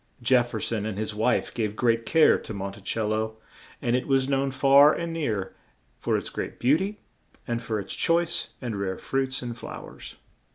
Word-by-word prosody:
Jef 120 0 +4
fer 110 - -4
son 110 -1 -1
and 105 -3 -4
his 110 0 -2
wife 110 +4 +1
gave 105 -3 -2
great 115 -1 +1
care 160 -1 +5
to 110 - -7
Mon 100 0 -4
ti 100 - -13
cel 110 +1 -1
lo, 110 0 -1 0.5
and 120 0 +2
it 125 - -1
was 135 -1 +2
known 135 0 +1
far 140 +2 +6
and 170 0 -3
near 110 -12 -2 0.4
for - - +1
its - - -4
great - - -5
beau 130 +5 +4
ty 195 +5 -2 0.5
and 120 -1 -1
for 110 -2 -2
its 100 - -5
choice 170 0 +1
and 110 -5 -3
rare 95 -1 -2
fruits 135 -1 -1
and 120 -1 -5
flow - - -8
ers. - - -10
120 Hz, 205 wpm, -26 LUFS, 110-135 Hz, 0.5 s, far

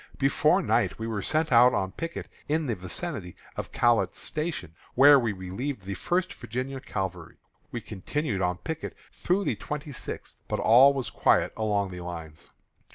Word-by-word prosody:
Before - - +3
night - - +1
we 110 - -4
were 110 -3 -2
sent 155 +8 +1
out 125 +1 +7
on 95 0 -1
picket 165 - -5 0.2
in 155 +1 +1
the 120 - 0
vicinity 95 - -4 0.2
of - - -5
Catlett's 115 -6 +2
Station, 150 - -3 0.2
where 140 +2 +8
we 115 -3 0
relieved 100 +6 -5
the 100 +1 -4
First 175 - -1
Virginia 130 +4 -4
Cavalry. 95 - -5 0.3
We 120 - -4
continued 105 - -3
on 90 -1 0
picket 160 - -5 0.2
through 190 +3 0
the - - 0
twenty 150 0 -6
sixth, 130 - -7
but - - -2
all 130 +5 +7
was 130 -3 -3
quiet - - +2
along 105 -3 0
the 90 0 -7
lines. 80 -3 -8
115 Hz, 165 wpm, -27 LUFS, 95-145 Hz, 0.3 s, where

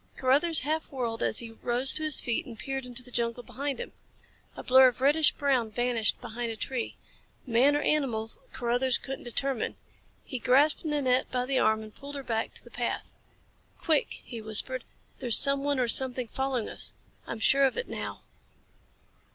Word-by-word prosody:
Carruthers 290 +6 +2
half 315 +4 -2
whirled 235 -4 -3
as - - +1
he 230 -1 -1
rose 245 +3 +3
to - - -3
his 310 -2 +3
feet 235 - -2
and 230 -3 -10
peered 270 0 -5
into 245 0 -5
the 250 - -12
jungle 235 0 -2
behind 280 +2 -4
him. - - -6 0.6
A - - -8
blur 260 +1 +7
of 250 -1 -2
reddish 290 +4 +5
brown 265 -6 +1
vanished 235 -1 0
behind 230 +1 -5
a - - -5
tree. 245 +2 -4 0.5
Man 255 +4 +3
or 295 - +1
animal 235 -7 0 0.2
Carruthers 245 +1 +1
couldn't 270 -1 -7
determine. 260 +1 -1 0.5
He 255 - -6
grasped 280 +6 +3
Nanette 265 -4 +1
by 250 0 -1
the 265 0 +1
arm 220 0 +2
and 215 -1 -12
pulled 285 +1 -9
her 280 - -6
back 225 -3 -3
to - - -8
the - - -15
path. - - -4 0.7
"Quick!" 315 -3 +1
he 235 -3 -7
whispered. 220 +4 +1 0.3
"There's 240 -3 +7
someone 280 0 +2
or 250 - +1
something 255 0 +1
following 265 -4 -2
us. - - -1 0.3
I'm 230 - -5
sure 275 +5 +4
of 265 - 0
it 485 - -3
now." - - -6
255 Hz, 180 wpm, -28 LUFS, 235-275 Hz, 0.7 s, blur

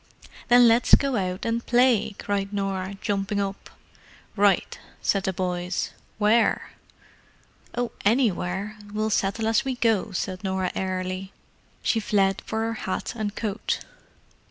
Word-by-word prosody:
"Then 245 0 +7
let's 230 +2 +6
go 275 -2 0
out 185 -2 -2
and 230 +1 0
play," 240 -4 +3
cried 200 -1 -2
Norah, 195 -1 -2
jumping 200 0 -1
up. 195 -1 -4 0.7
"Right!" 200 -2 +2 0.2
said 195 -1 +1
the 190 - +1
boys. 180 0 -2 0.3
"Where?" 220 +2 +2 1.0
"Oh, 245 -1 -1
anywhere—we'll 210 -1 0
settle 205 +2 0
as 225 -1 +3
we 265 -1 -2
go!" 225 -4 +1
said 185 +1 -3
Norah 190 -1 -1
airily. 185 0 -3 0.5
She 225 - +2
fled 195 -2 +1
for 220 0 -1
her 225 0 -1 0.2
hat - - -2
and 215 -2 -3
coat. 215 -1 -2
205 Hz, 130 wpm, -25 LUFS, 190-225 Hz, 1.0 s, Then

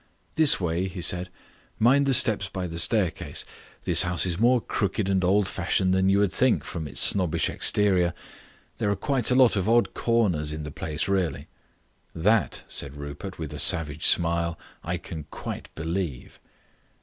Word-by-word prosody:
"This 155 -2 +5
way," 90 +1 -2
he 95 0 -8
said; 90 +1 +2 0.5
"mind 135 +5 +3
the 135 - +3
steps 110 -6 +3
by 95 0 -5
the 85 -1 -4
staircase. 95 -1 -1 0.4
This - - +5
house 90 0 0
is 90 -1 -2
more 120 +2 +4
crooked 100 -2 -2
and 95 -1 0
old 95 +2 +2
fashioned 95 -1 0
than 95 0 +2
you 100 - +3
would 100 -2 +1
think 130 -2 +2
from 80 -3 -6
its 70 - -3
snobbish 90 -5 +1
exterior. 90 -4 +2 0.6
There 105 - 0
are 100 - +1
quite 135 +1 0
a 125 - +2
lot 130 -4 +5
of 100 +1 -1
odd 120 +1 +2
corners 95 -11 0
in 75 0 -6
the 75 - -7
place 75 +1 -4
really." 95 -4 -2 0.7
"That," 105 +7 +1
said 70 +1 -4
Rupert, 75 +7 -8
with 80 -2 -7
a 75 - -7
savage 75 +1 +2
smile, 85 0 +1 0.3
"I 85 +2 -3
can 80 -3 -9
quite - - -7
believe." 80 -4 -5
95 Hz, 175 wpm, -25 LUFS, 85-105 Hz, 0.7 s, This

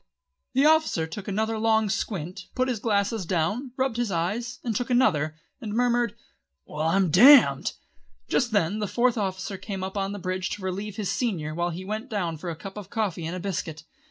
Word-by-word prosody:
The 270 +3 +4
officer 315 - +3
took 185 +6 -8
another 220 +2 -1
long 220 -1 +3
squint, 190 -4 -3
put 255 0 +1
his 245 -4 -1
glasses 205 -1 0
down, 190 - -1
rubbed 260 -3 0
his 240 -2 0
eyes 205 +8 -2
and 230 -3 -2
took 245 +3 -2
another, 170 - +2 0.3
and 215 -3 -5
murmured, 240 -2 +2 0.5
"Well 155 +1 -2
I'm 185 0 +2
damned!" 215 - +7 0.5
Just 240 - +1
then 205 0 +1
the 210 - -1
Fourth 245 +3 +2
Officer 190 -2 -3
came 195 -3 -5
up 190 +1 -5
on 195 0 0
to - - -5
the 205 - -6
bridge 185 0 -2
to 205 - -12
relieve 195 +2 -4
his 205 -3 -2
senior 170 -11 -1
while 175 +2 -1
he 175 +2 -6
went 215 +6 -4
down 175 -7 -2
for 175 +3 -6
a 165 - -4
cup 195 +5 -9
of 200 -2 -8
coffee 195 -8 -2
and 170 - -4
a - - -4
biscuit. 170 -4 -4
200 Hz, 205 wpm, -26 LUFS, 180-230 Hz, 0.5 s, damned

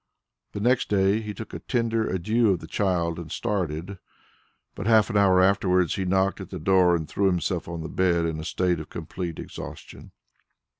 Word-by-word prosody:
The - - -4
next 125 +4 +2
day 100 +1 +2
he 105 -1 -5
took 110 +2 -9
a - - -5
tender 115 -3 -1
adieu 110 +5 +1
of 95 - +2
the 80 - -9
child 85 -2 -1
and 85 -2 -8
started; 95 -4 -3 0.7
but - - -5
half 110 0 +4
an - - -5
hour 95 -2 +5
afterwards 95 -2 +3
he 95 - -2
knocked 95 +1 +1
at 95 - -8
the 95 - -6
door 90 +1 +4
and 80 -2 -3
threw 100 +5 +1
himself 90 -1 -1
on 85 -1 -5
the - - -4
bed 85 -1 +1
in 80 -1 -2
a - - -5
state 90 0 0
of 80 - -8
complete 85 0 -6
exhaustion. - - -9
95 Hz, 195 wpm, -25 LUFS, 85-100 Hz, 0.7 s, hour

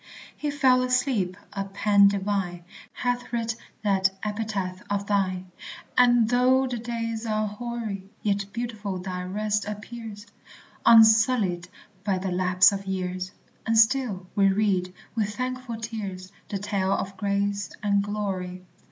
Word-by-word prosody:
"He 295 - -3
fell 265 -3 +4
asleep." 250 -8 +1 0.2
A 200 -1 -2
pen 200 +1 +4
divine 195 -3 -1 0.3
Hath 245 0 -2
writ 230 -1 -1 0.3
that 195 -2 +3
epitaph 205 -3 -3
of 200 0 -1
thine; 185 -3 -1 0.4
And 240 -2 +5
though 250 +2 +4
the 250 -2 -3
days 230 -1 -3
are 215 0 0
hoary, 210 -3 -5
Yet 200 -1 0
beautiful 215 -4 -4
thy 180 0 -4
rest 210 +3 -1
appears 210 0 -7 0.6
Unsullied 220 -5 +5 0.3
by 200 -2 +1
the 185 0 -3
lapse 180 0 +5
of 195 -1 -5
years 185 -1 -3 0.4
And 225 0 +2
still 220 -5 +3
we 195 -1 +4
read, 190 -2 +1 0.2
with 210 -3 -1
thankful 255 -2 -4
tears, 200 -5 -6 0.2
The 200 - -2
tale 195 -1 0
of 195 0 -3
grace 200 0 -1
and 200 -1 +3
glory. 190 -3 -3
205 Hz, 135 wpm, -26 LUFS, 190-230 Hz, 0.6 s, And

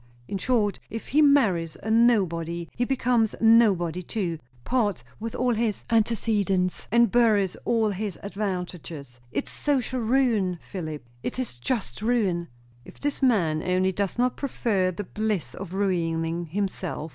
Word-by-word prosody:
In 195 - -3
short, 215 -3 +1
if 225 +1 -7
he 300 +4 +4
marries 205 - +3
a 220 - -2
nobody 170 -8 +2
he 245 - 0
becomes 245 -4 +1
nobody 200 -7 +4
too; 175 -4 -3 0.2
parts 210 - 0 0.2
with 225 +1 -5
all 250 0 +1
his 225 -2 -1
antecedents, 210 -5 +1
and 235 +1 +4
buries 215 -6 +3
all 225 -2 +2
his 200 -1 -4
advantages. 180 - -5
It's - - -2
social 260 -3 -1
ruin, 225 -6 +2
Philip! 155 -8 -6 0.2
it - - -4
is 235 - -4
just 215 - -2
ruin." 205 -7 +1 0.4
"If - - -15
this 290 0 -1
man 175 - +2
only 185 +2 +1
does 195 +2 -2
not 250 +1 +1
prefer 215 -9 0
the 185 +3 -4
bliss 210 -2 -2
of 190 -2 -7
ruining 170 -3 0
himself!" 185 -3 -3
205 Hz, 145 wpm, -26 LUFS, 175-235 Hz, 0.4 s, he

